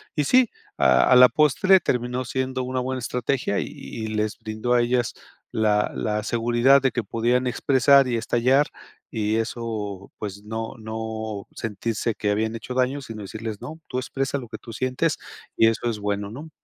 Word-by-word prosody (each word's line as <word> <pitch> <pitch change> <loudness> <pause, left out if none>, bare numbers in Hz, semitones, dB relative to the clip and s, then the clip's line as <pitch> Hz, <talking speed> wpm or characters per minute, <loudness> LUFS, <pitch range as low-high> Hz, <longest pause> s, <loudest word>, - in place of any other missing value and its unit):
Y 150 - +2
sí, 250 - +5 0.3
a 65 -1 +5
a - - +8
la 125 - +10
postre 155 +6 +4
terminó 125 +1 -1
siendo 130 +2 -2
una 130 0 -2
buena 130 0 -2
estrategia. 125 -2 -1
Y - - -3
y 110 -1 -7
les 110 -1 -2
brindó 110 +2 -2
a 120 - +5
ellas, 120 0 +1 0.4
la 105 -1 +2
la 105 -1 -1
seguridad 120 +4 +3
de 135 -2 +2
que 120 -2 -2
podían 120 +3 +1
expresar 135 +2 +4
y 120 - 0
estallar, 125 +5 +2 0.4
y 110 0 0
eso, 110 -4 -4
pues, 100 -1 -6
no 110 +3 -4
no 110 -1 -5
sentirse 115 +1 -2
que 105 -1 -1
habían 110 +2 0
hecho 115 +3 -6
daños, 130 +2 0
sino 110 -2 -7
decirles: 110 +1 -6
"No, 160 +1 -8
tú 125 - -1
expresa 135 +1 -2
lo 125 -4 -7
que - - -6
tú 115 - -10
sientes 130 +6 0 0.4
y 115 - +6
eso 115 +1 0
es 110 -2 -3
bueno", 100 0 -2
¿no? 150 +7 -8
120 Hz, 180 wpm, -24 LUFS, 110-130 Hz, 0.4 s, la